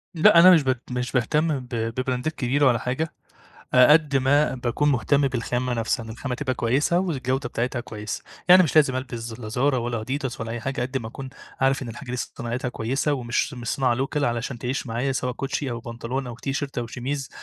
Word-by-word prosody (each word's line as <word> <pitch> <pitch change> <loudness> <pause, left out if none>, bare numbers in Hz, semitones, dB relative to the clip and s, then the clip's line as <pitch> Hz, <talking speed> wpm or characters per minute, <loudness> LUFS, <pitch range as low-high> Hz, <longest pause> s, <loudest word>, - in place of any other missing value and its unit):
لأ 170 +2 +7
أنا 185 +2 +9
مش 165 -5 +6
ب 130 -1 +2 0.2
مش 125 0 -2
باهتم 150 +4 +1
ب 125 -1 -12
ببرندات 125 +5 -2
كبيرة 140 +3 +1
ولا 120 -3 +3
حاجة 150 +6 -2 0.6
قد 145 +3 +6
ما 140 +3 +3
باكون 125 +3 0
مهتم 140 +2 +2
بالخامة 125 0 -2
نفسها 115 0 -1
إن 110 - -9
الخامة 125 +3 -4
تبقى 130 0 -2
كويسة 135 +9 +1
والجودة 135 -7 -1
بتاعتها 120 +1 -2
كويسة، 110 -3 -6 0.3
يعني 185 +1 +9
مش 160 -3 -1
لازم 140 -4 +5
ألبس 120 -3 -5
لا 110 -3 -7
Zara 110 - -4 0.2
ولا 120 -2 -2
adidas 130 -1 -3
ولا 115 0 -4
أي 120 +1 -4
حاجة 135 +3 -3
قد 130 +2 -2
ما 110 -3 -7
أكون 135 +3 -8 0.3
عارف 135 0 +2
إن 125 - -6
الحاجة 120 +3 -8
دي 125 - -2
صناعتها 120 +1 -4
كويسة 130 +5 -1
ومش 125 +1 -1
مش 120 -2 -7
صناعة 130 -3 +1
local 145 +1 -2
علشان 120 0 -1
تعيش 125 +3 -3
معايا 120 +4 -1
سواء 125 -1 -2
كوتشي 135 +1 -3
أو 120 -1 -4
بنطلون 120 +3 -4
أو 120 - -6
تيشيرت 135 +1 -3
أو 120 - -2
شميز 135 +4 -4
130 Hz, 205 wpm, -24 LUFS, 120-140 Hz, 0.6 s, أنا